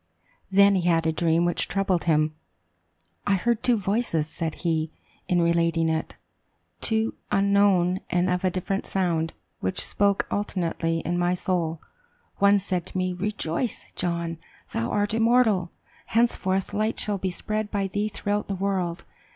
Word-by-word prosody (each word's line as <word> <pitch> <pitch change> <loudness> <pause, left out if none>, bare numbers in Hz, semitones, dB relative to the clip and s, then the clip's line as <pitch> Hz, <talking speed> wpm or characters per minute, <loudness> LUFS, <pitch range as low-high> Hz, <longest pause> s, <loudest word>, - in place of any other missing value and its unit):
"Then 200 +1 +6
he 180 -2 +1
had 165 -1 +2
a 160 - +3
dream 165 +1 +2
which 175 - 0
troubled 190 -3 0
him. 155 -2 +2 0.9
'I 200 - +4
heard 235 +4 0
two 245 -2 +3
voices,' 195 -6 0
said 160 0 -4
he, 160 -1 +1 0.4
in 175 -1 +2
relating 170 -1 +2
it; 160 0 -2 0.7
'two 220 0 0 0.2
unknown 195 -2 +3
and 180 +1 +1
of 180 0 0
a 185 - +3
different 190 +2 -2
sound, 170 -4 0 0.3
which 95 - 0
spoke 200 -1 +2
alternately 170 -4 -1
in 175 +1 -1
my 175 +1 +2
soul. 170 -3 -2 0.5
One 200 +1 +5
said 185 -3 -2
to - - -5
me, 185 0 0
"Rejoice, 200 +2 -3
John; 170 -2 -2 0.3
thou 115 - -1
art 205 +1 0
immortal! 225 -5 +3 0.4
Henceforth, 200 -5 +1
light 215 +2 0
shall 205 -2 +1
be 190 - -1
spread 215 +4 -3
by 200 -2 -1
thee 205 +2 -1
throughout 205 0 -2
the 195 - -2
world. 185 -3 -2
185 Hz, 150 wpm, -25 LUFS, 170-205 Hz, 0.9 s, Then